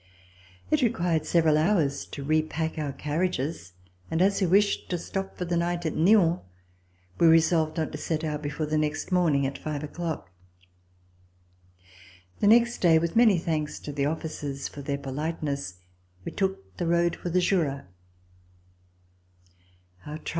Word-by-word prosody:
It 305 -1 +3
required 170 -9 +1
several 160 -3 +3
hours 155 -5 +1
to 140 - -7
repack 155 +2 -1
our 145 -2 -2
carriages, 150 - -2 0.4
and 160 - -1
as 195 +2 +3
we 190 - +3
wished 200 +3 +2
to 180 - -1
stop 195 +3 -5
for 180 - -3
the 175 0 -1
night 175 0 -1
at 160 - -1
Nyon, 175 -1 +4 0.8
we 170 - +6
resolved 160 0 +3
not 160 -2 -1
to - - -6
set 160 -1 -2
out 150 -1 -2
before 150 +1 -3
the 155 +1 0
next 150 +4 -2
morning 160 -7 +3
at 135 +1 -4
five 150 -1 -4
o'clock. 160 - -5 2.1
The - - +2
next 235 +2 +5
day, 165 -3 +5
with 170 +5 -1
many 225 -5 +6
thanks 155 -3 -2
to 150 - -6
the 140 0 0
officers 145 -3 -4
for 145 - -9
their 140 0 -2
polite 150 +4 -4
ness, 140 -10 -3 0.5
we - - -4
took 190 - -3
the 175 - -2
road 170 0 +2
for 175 - -5
the 180 +2 +2
Jura. 165 -7 0
160 Hz, 155 wpm, -27 LUFS, 150-175 Hz, 2.1 s, we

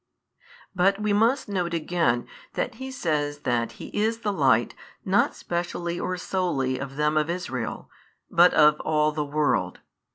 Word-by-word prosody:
But 195 +2 +2
we 210 -1 0
must 235 +6 +2
note 180 -4 -1
again 160 -7 0 0.3
that 250 - -2
He 265 - -4
says 150 - -2
that 120 -1 -1
He - - -9
is 220 +2 -1
the 210 -3 -1
Light 130 - +3 0.3
not - - +2
specially 175 0 -3
or 185 - -2
solely 140 -9 -1
of 135 0 -6
them 150 +1 +1
of 155 +1 +1
Israel, 180 +2 -4 0.4
but 180 -1 +5
of 150 0 +5
all 155 -1 +1
|563 - - -14
the 150 - 0
world. 150 0 0
170 Hz, 160 wpm, -25 LUFS, 145-190 Hz, 0.4 s, but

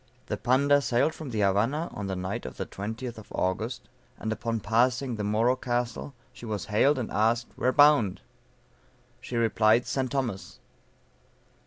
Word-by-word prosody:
The - - -3
Panda 140 +4 +3
sailed 130 +4 +1
from 155 -4 -8
the 110 -3 -1
Havana 115 - +1
on 100 -1 -5
the 95 - -2
night 90 -7 -4
of 65 - -9
the - - -3
20th 110 +4 -6
of 105 - -15
August; 110 +7 -2 0.3
and 110 - -4
upon 115 0 -2
passing 120 +5 +1
the 105 - -4
Moro 110 +5 +2
Castle, 125 +2 -3 0.2
she 125 - -14
was 105 -6 -3
hailed, 140 +7 +4
and 120 -4 -3
asked, 115 +3 +1
"where 130 - +1
bound?" 145 -9 +5 1.0
She 125 - -7
replied, 115 +1 +3
St. 130 -2 -2
Thomas. 115 -10 -3
115 Hz, 160 wpm, -27 LUFS, 105-130 Hz, 1.0 s, bound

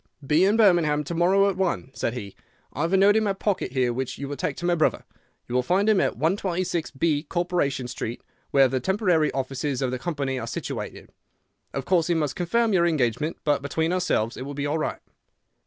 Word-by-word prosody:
"'Be 155 +6 +4
in 205 +3 +3
Birmingham 170 -8 +4
to 160 - -5
morrow 190 +4 +3
at 195 - 0
one,' 180 -8 -1
said 115 - -2
he. 100 -5 -7 0.4
'I 145 - -4
have 165 +3 0
a - - +5
note 200 +2 +5
in 220 - +3
my 200 -2 +1
pocket 195 -7 -2
here 125 -3 +1
which 130 +1 -4
you 140 - -5
will 145 - -4
take - - -2
to 175 - -6
my 175 - +3
brother. 160 -2 +1 0.4
You 120 - -6
will 125 - +3
find 185 +10 +1
him 215 -3 +4
at - - 0
126B, 170 -4 -1
Corporation 175 -8 -1
Street, 120 -1 -5 0.3
where 135 -1 +5
the 130 +1 -1
temporary 180 - +1
offices 135 0 -2
of 130 -2 -1
the 130 - -3
company 135 -2 -2
are 115 - -5
situated. 115 - -6 0.6
Of 135 - -4
course 175 -4 +2
he 175 - +1
must 150 -4 -1
confirm 220 +6 +1
your 175 -2 +4
engagement, 150 0 0
but 145 -2 +1
between 160 +4 -1
ourselves 175 -11 0
it - - -7
will 140 +2 -6
be 140 0 -2
all 150 +2 0
right. - - -3
155 Hz, 215 wpm, -25 LUFS, 135-180 Hz, 0.6 s, a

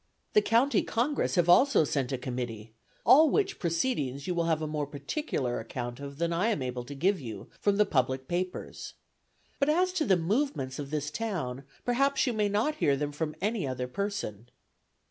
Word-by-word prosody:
The 425 - +6
County 250 - +3
Congress 250 +3 0
have 175 -2 +3
also 220 - +6
sent 140 -4 -1
a 130 - 0
committee; 120 -3 -5 0.3
all 310 +3 +7
which 405 +2 0
proceedings 165 - -1
you 180 - -1
will 170 -1 0
have 160 -2 +1
a 155 - -2
more 150 -1 -2
particular 140 - -3
account 120 +2 -5
of 140 0 -8
than 170 +1 0
I 180 +6 +1
am 210 - 0
able 125 -1 -3
to 145 - -8
give 185 +6 +1
you, 110 -6 -8
from 200 -1 +2
the 210 - +5
public 130 -2 0
papers. 180 +3 -4 0.6
But 280 - +2
as 365 +4 +2
to 335 -5 0
the 190 - +4
movements 175 - -1
of 140 -1 -5
this 150 0 -2
town, 150 - -3 0.2
perhaps 275 +3 +2
you 250 - 0
may 210 -2 +1
not 225 +10 0
hear 140 - +2
them 145 +1 -2
from 150 +1 -3
any 210 -7 0
other 125 -1 -3
person. 125 - -4
165 Hz, 190 wpm, -29 LUFS, -, 0.6 s, all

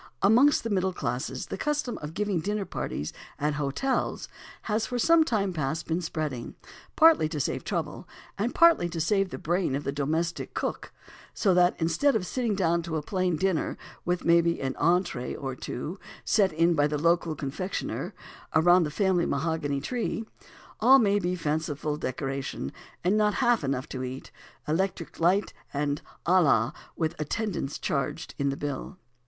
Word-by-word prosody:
Amongst 245 +9 +5
the 230 - -3
middle 190 -1 +1
classes 125 -3 -3
the - - -6
custom 295 -5 -1
of 150 +2 -7
giving 205 -4 0
dinner 205 +4 -2
parties 75 - -4 0.2
at 150 +1 0
hotels 150 - -1 0.4
has 220 0 0
for 245 - -2
some 330 +6 +5
time 205 - 0
past 155 0 -2
been 165 +2 -1
spreading, 155 -7 -4 0.4
partly 315 - +6
to 155 -2 -3
save - - -1
trouble, - - -3 0.3
and 230 +5 -2
partly 335 - +5
to 165 0 -4
save 195 +4 +2
the - - -6
brain 175 -4 0
of 140 - -3
the 140 - -1
domestic 160 +4 -2
cook; - - -3 0.4
so 195 -4 +3
that 180 0 +4
instead 170 - +2
of 200 -5 0
sitting 235 0 -1
down 170 -3 +2
to 165 -1 -4
a 150 - -3
plain 185 0 0
dinner, 190 0 0 0.3
with, 175 0 -1
maybe, 170 0 +4
an 135 -1 -2
entrée 175 -7 +1
or 135 -2 -4
two 150 +9 -5 0.3
sent 200 -4 +3
in 165 +2 +3
by 145 -2 +3
the 150 0 -1
local 170 +1 +2
confectioner 150 +7 -4 0.4
around 175 +2 +6
the - - -2
family 180 +1 +1
mahogany 145 -1 -1
tree, 225 - -2 0.5
all 255 +5 +7
may 205 -5 +3
be 180 -1 -1
fanciful 150 -2 -2
decoration, 135 - -4 0.3
and 185 +4 +3
not 210 -1 +2
half 240 - +2
enough 135 -2 -1
to 130 - -5
eat, 130 +1 -6 0.4
electric 170 +2 -2
light, 180 +5 +2 0.2
and 145 0 -1 0.2
à 185 +1 +5
la 115 -6 +3 0.2
with 160 -2 -1
attendance 170 -2 -2
charged 140 -6 -2
in 140 0 +1
the 135 - -3
bill. 145 +6 -5
170 Hz, 170 wpm, -27 LUFS, 145-200 Hz, 0.5 s, all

